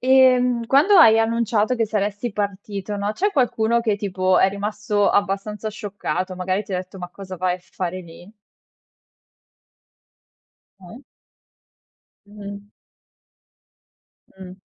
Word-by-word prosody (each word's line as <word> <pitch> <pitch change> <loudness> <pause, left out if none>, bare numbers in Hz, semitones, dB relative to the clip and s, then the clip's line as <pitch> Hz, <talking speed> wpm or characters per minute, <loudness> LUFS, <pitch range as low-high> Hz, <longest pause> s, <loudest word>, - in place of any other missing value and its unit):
E, 260 0 +5
mhmm, 245 -2 0
quando 305 - +5
hai 225 -9 +7
annunciato 225 0 +1
che 230 -2 0
saresti 205 +2 -2
partito, 200 0 -4
no, 200 +1 -2
c'è 405 - 0
qualcuno 235 - +1
che 220 -3 0
tipo, 185 -2 +1
è 190 - +5
rimasto 205 0 -1
abbastanza 205 +2 -1
scioccato? 200 -3 -4
Magari, 185 +2 -2
ti - - -9
detto: 185 +1 -5
"Ma 180 -1 -6
cosa 185 +1 -9
vai 180 0 0
a - - -18
fare 185 0 -5
lì?" 175 +2 -14 2.5
Mh. 190 +8 -13 1.2
Mh-mh. 205 0 -10 1.7
Mh. 185 -1 -10
205 Hz, 120 wpm, -22 LUFS, 190-225 Hz, 2.5 s, hai